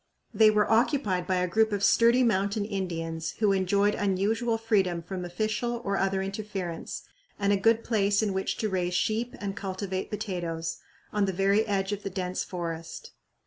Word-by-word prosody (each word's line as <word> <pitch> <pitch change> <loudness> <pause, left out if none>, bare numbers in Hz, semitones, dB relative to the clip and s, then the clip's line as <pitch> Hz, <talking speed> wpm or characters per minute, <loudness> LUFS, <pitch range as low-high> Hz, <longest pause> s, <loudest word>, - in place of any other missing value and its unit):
They 220 -1 +6
were 210 -1 +3
occupied 225 - +2
by 185 - +1
a 180 0 +1
group 220 +5 +2
of 200 -1 -1
sturdy 235 +4 +5
mountain 200 -1 +1
Indians, 165 -5 -3
who 210 -2 +3
enjoyed 200 +2 +2
unusual 215 +4 0
freedom 195 -7 +1
from 185 +1 -5
official 215 +6 -2
or 200 0 0
other 195 0 0
interference 195 -4 -5 0.3
and 200 0 +2
a - - +4
good 225 +3 +3
place 205 -2 +2
in 205 -2 0
which 190 0 -2
to 215 - -1
raise 180 -2 -1
sheep 220 +6 0
and 200 -1 -4
cultivate 190 -1 -4
potatoes, 175 -6 -3 0.3
on 210 -1 +2
the 190 - -1
very 200 +4 +2
edge 195 -1 0
of 205 -1 -3
the 195 - -4
dense 185 -1 -3
forest. 165 -2 -6
200 Hz, 175 wpm, -28 LUFS, 185-215 Hz, 0.3 s, They